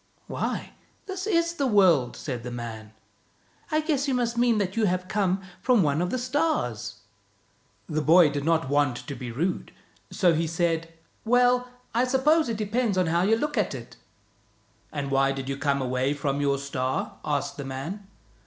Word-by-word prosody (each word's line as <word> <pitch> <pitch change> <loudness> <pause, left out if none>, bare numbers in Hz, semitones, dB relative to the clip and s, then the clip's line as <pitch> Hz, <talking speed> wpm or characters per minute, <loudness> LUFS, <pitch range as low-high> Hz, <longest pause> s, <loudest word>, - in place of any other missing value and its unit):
" - - -39
" - - -37
Why, - - -3 0.3
this 380 0 -5
is 335 -4 +2
the 280 -5 0
world," 180 - +4
said 125 -5 -4
the 125 - -6
man. 115 -3 -7 0.4
" - - -30
I 310 0 +2
guess 300 -3 0
you 265 - +1
must 240 -1 0
mean 235 -1 +3
that 195 -2 -1
you 225 -1 +2
have 185 -1 0
come 195 -1 0 0.2
from 245 -6 +4
one 145 +1 +1
of 180 - 0
the 255 - -1
stars." 250 - -1 0.9
The 155 -2 -1
boy 160 0 +6
did 145 -1 -3
not 165 -1 +2
want 145 -2 +2
to 140 - -5
be 125 -3 -6
rude, 165 +10 -2 0.4
so 180 -5 +3
he 165 +1 0
said, 165 0 -1 0.2
" - - -39
Well, 250 0 +4 0.2
I 240 +2 +3
suppose 275 +3 +3
it 225 - -2
depends 215 0 0
on 185 - +3
how 170 +1 +1
you 210 +5 +4
look 295 +5 -1
at - - 0
it." - - -10 0.5
" - - -37
And 140 -2 -4
why 135 0 +3
did 135 -1 -5
you 135 - -2
come 140 -1 0
away 130 +3 0
from 140 0 -1
your 140 -1 +2
star? 130 -2 -3
" - - -31
asked 145 -2 -2
the 140 - -4
man. 160 +10 -6
170 Hz, 200 wpm, -26 LUFS, -, 0.9 s, boy